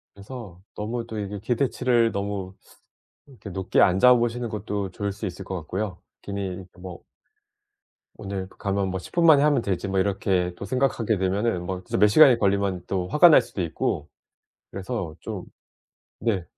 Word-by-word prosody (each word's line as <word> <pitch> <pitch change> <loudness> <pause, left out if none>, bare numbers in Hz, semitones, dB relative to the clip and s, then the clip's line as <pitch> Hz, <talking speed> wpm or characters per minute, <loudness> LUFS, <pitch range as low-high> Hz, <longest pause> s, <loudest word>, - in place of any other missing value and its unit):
그래서 100 -4 -10
너무 115 +3 -4
또 110 -2 -5
이게 100 0 -5
기대치를 120 0 +1
너무 100 -1 -4 0.7
그렇게 125 -7 -11
높게 95 0 0
안 95 -1 +4
잡으시는 120 0 +4
것도 105 -2 -3
좋을 100 +1 -3
수 105 +2 -6
있을 95 +1 -6
것 95 - -5
같고요. 90 +3 -4 0.2
괜히 95 -2 -5
뭐 90 -1 -9 1.1
오늘 95 -1 -5
가면 100 -1 -2
뭐 95 0 -3
'10 - - -12
분 170 -1 +3
만에 150 -3 +7
하면 145 -5 +3
되지.' 100 -1 -2
뭐 95 0 0
이렇게 95 -2 0
또 100 - -6
생각하게 120 -3 0
되면은 95 0 0
뭐 95 0 -4
진짜 - - -3
몇 105 +2 +6
시간이 130 +1 +7
걸리면 100 -3 0
또 90 -2 -2
화가 160 - +6
날 150 - +7
수도 95 - -6
있고 85 -3 -2 0.6
그래서 95 -5 -5
좀 - - -6 0.8
네. 100 -5 0
100 Hz, 310 characters per minute, -25 LUFS, 95-115 Hz, 1.1 s, 만에